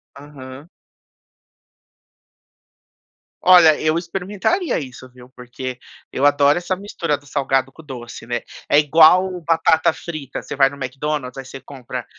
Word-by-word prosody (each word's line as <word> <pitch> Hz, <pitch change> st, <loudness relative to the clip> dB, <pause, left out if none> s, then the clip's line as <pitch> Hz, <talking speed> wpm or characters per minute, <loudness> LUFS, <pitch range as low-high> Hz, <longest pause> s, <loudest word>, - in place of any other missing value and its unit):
Aham. 140 Hz, +1 st, -12 dB, 2.7 s
Olha, 175 Hz, -4 st, +6 dB
eu 155 Hz, +1 st, +1 dB
experimentaria 195 Hz, -, -2 dB
isso, 130 Hz, -2 st, -10 dB
viu, 125 Hz, 0 st, -17 dB
porque 125 Hz, 0 st, -8 dB, 0.3 s
eu 135 Hz, -, 0 dB
adoro 145 Hz, +1 st, +4 dB
essa 180 Hz, +1 st, -2 dB
mistura 175 Hz, -6 st, -3 dB
do 145 Hz, -, -22 dB
salgado 135 Hz, -2 st, -1 dB
com 160 Hz, -, -15 dB
doce, 120 Hz, -6 st, -9 dB
né. 120 Hz, 0 st, -3 dB, 0.3 s
É 145 Hz, -, +5 dB
igual 165 Hz, +5 st, +4 dB
batata 165 Hz, -1 st, +2 dB
frita, 155 Hz, -4 st, -7 dB
você -, -, -7 dB
vai 135 Hz, -1 st, +4 dB
no 140 Hz, -, -11 dB
McDonald's, 135 Hz, 0 st, -4 dB
aí 135 Hz, -, -7 dB
você 135 Hz, +1 st, -10 dB
compra 130 Hz, -2 st, -8 dB
145 Hz, 135 wpm, -20 LUFS, 130-165 Hz, 2.7 s, Olha